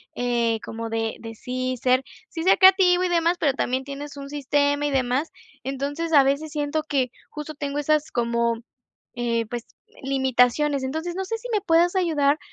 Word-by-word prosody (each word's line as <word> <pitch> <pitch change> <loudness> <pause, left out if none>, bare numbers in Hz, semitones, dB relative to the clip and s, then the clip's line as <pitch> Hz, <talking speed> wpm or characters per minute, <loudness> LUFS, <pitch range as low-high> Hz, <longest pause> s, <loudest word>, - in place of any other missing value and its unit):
eh, 235 -2 0
como 225 0 -5
de 225 0 -2
de 225 -1 -8
sí 255 +2 -3
ser 255 +1 +3 0.3
sí 325 - -5
ser 375 - +5
creativo 375 -1 +6
y 365 - +1
demás, 340 0 +2
pero 285 -4 +2
también 260 0 -1
tienes 285 +1 -8
un 275 0 -7
sistema 285 0 +1
y - - -2
demás. 260 +3 0 0.3
Entonces, 285 +5 -3
a 280 -2 +8
veces 285 +3 0
siento 300 +1 -1
que 265 -5 0 0.2
justo 300 0 -7
tengo 285 0 -4
esas 305 +1 +1
como, 235 -1 0 0.6
eh, 235 -2 -1
pues, 240 +1 -5 0.4
limitaciones. 265 +1 +2
Entonces, 320 +6 -3
no 385 - -2
sé 450 +4 -3
si - - -8
me 420 - +2
puedas 345 +1 +3
ayudar 305 -5 +2
280 Hz, 175 wpm, -24 LUFS, 250-315 Hz, 0.6 s, a